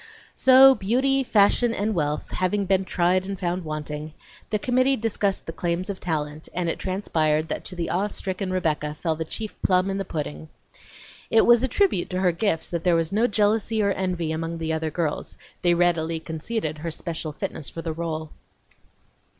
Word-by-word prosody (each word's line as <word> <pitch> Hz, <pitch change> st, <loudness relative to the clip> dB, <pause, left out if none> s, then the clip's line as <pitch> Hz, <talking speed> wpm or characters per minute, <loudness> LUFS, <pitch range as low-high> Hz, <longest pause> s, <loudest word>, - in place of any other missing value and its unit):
So, 265 Hz, +1 st, +8 dB
beauty, 260 Hz, +6 st, +1 dB
fashion, 230 Hz, 0 st, +3 dB
and 210 Hz, +2 st, 0 dB
wealth 150 Hz, -4 st, -2 dB
having 190 Hz, +2 st, 0 dB
been 190 Hz, 0 st, +2 dB
tried 180 Hz, +1 st, +1 dB
and 195 Hz, 0 st, -5 dB
found 180 Hz, 0 st, -2 dB
wanting, 155 Hz, 0 st, -5 dB, 0.3 s
the 215 Hz, -, +1 dB
committee 255 Hz, +4 st, +2 dB
discussed 210 Hz, -4 st, -1 dB
the -, -, -5 dB
claims 175 Hz, +4 st, -2 dB
of 190 Hz, -, -8 dB
talent, 155 Hz, -2 st, -3 dB
and 180 Hz, -1 st, -1 dB
it 165 Hz, -, -2 dB
transpired 160 Hz, -5 st, 0 dB
that -, -, -3 dB
to 185 Hz, -, -5 dB
the 170 Hz, -1 st, -3 dB
awe 195 Hz, +3 st, +1 dB
stricken 190 Hz, -1 st, -3 dB
Rebecca 155 Hz, -4 st, -1 dB
fell 160 Hz, +1 st, -1 dB
the 160 Hz, -, -3 dB
chief 215 Hz, +6 st, -6 dB
plum 185 Hz, +1 st, +2 dB
in 195 Hz, -, -2 dB
the -, -, -1 dB
pudding. 80 Hz, -, -5 dB, 0.8 s
It 225 Hz, -, +5 dB
was 240 Hz, -1 st, +6 dB
a -, -, +2 dB
tribute 310 Hz, -, +1 dB
to 185 Hz, -, -2 dB
her 180 Hz, -2 st, +4 dB
gifts 170 Hz, -1 st, -1 dB
that 170 Hz, -2 st, -2 dB
there 175 Hz, -2 st, +3 dB
was 165 Hz, -1 st, 0 dB
no 220 Hz, +4 st, +3 dB
jealousy 215 Hz, 0 st, +1 dB
or 200 Hz, -, +2 dB
envy 180 Hz, -4 st, -1 dB
among 165 Hz, +1 st, -3 dB
the 160 Hz, -1 st, -2 dB
other 160 Hz, 0 st, -1 dB
girls; 155 Hz, -1 st, -3 dB, 0.2 s
they 175 Hz, -1 st, +3 dB
readily 165 Hz, -2 st, +1 dB
conceded 160 Hz, 0 st, -4 dB
her 165 Hz, +2 st, -4 dB
special 160 Hz, -1 st, -4 dB
fitness 150 Hz, 0 st, -4 dB
for 165 Hz, -, -7 dB
the 160 Hz, -, -3 dB
role. 160 Hz, -1 st, -4 dB
180 Hz, 190 wpm, -24 LUFS, 160-205 Hz, 0.8 s, So